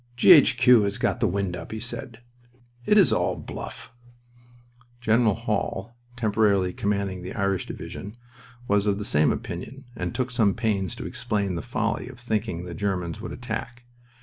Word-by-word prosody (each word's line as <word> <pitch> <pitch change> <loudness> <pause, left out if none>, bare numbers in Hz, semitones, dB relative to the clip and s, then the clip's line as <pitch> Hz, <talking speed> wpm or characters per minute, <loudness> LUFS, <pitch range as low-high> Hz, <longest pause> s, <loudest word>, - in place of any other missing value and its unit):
"G.H.Q. 125 - +7
has 100 0 -1
got - - 0
the 115 - +2
wind 95 -1 -1
up," - - -8
he 110 - -4
said. 120 0 -6 0.7
"It 210 - +5
is 195 - +6
all - - +1
bluff." - - -8 1.1
General 115 -3 +3
Hall, 110 -1 -3 0.2
temporarily 105 -5 +2
commanding 100 -2 -1
the 90 +1 -7
Irish 100 -3 0
Division, 105 +4 -7 0.5
was 100 0 +2
of 100 -1 +2
the 105 - -4
same 75 -6 +3
opinion, 135 +3 -6
and 90 +5 -4
took 125 0 -1
some 110 -6 +2
pains 100 -5 -1
to - - -7
explain 105 -5 -2
the 85 - -3
folly 115 -1 -2
of 130 0 -11
thinking 110 -7 -2
the 90 - -7
Germans 90 0 -2
would - - -6
attack. 120 +1 -5
105 Hz, 160 wpm, -25 LUFS, 100-120 Hz, 1.1 s, G.H.Q